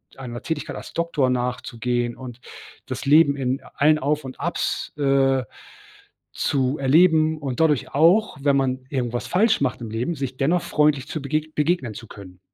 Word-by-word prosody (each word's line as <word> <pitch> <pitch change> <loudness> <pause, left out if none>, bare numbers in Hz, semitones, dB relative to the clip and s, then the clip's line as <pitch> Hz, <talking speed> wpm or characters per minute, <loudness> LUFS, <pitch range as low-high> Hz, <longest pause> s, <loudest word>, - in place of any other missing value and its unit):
einer 120 -3 -7
Tätigkeit 155 -2 -4
als - - -10
Doktor 165 -6 0
nachzugehen 125 -1 -2
und 125 -2 -9 0.5
das - - -6
Leben 145 0 +5
in 130 -1 -2
allen 155 +2 +4
Auf 150 +2 -1
und 130 -1 -9
Abs, - - -2
äh, 135 -2 +2 0.9
zu 135 0 0
erleben 155 +2 +4
und 135 -5 -5
dadurch 155 -4 +1
auch, 170 +7 +3
wenn 140 0 +3
man 130 -1 -1
irgendwas 120 -3 -2
falsch 220 +2 +2
macht 130 -3 -1
im 115 -2 -6
Leben, 120 +9 -2
sich 135 -3 -4
dennoch 165 +6 +1
freundlich 150 -2 +1
zu 155 -1 -5
begeg 155 +2 -2
begegnen 150 -6 0
zu 115 +2 -10
können. 95 -3 -12
135 Hz, 165 wpm, -23 LUFS, 125-155 Hz, 0.9 s, Leben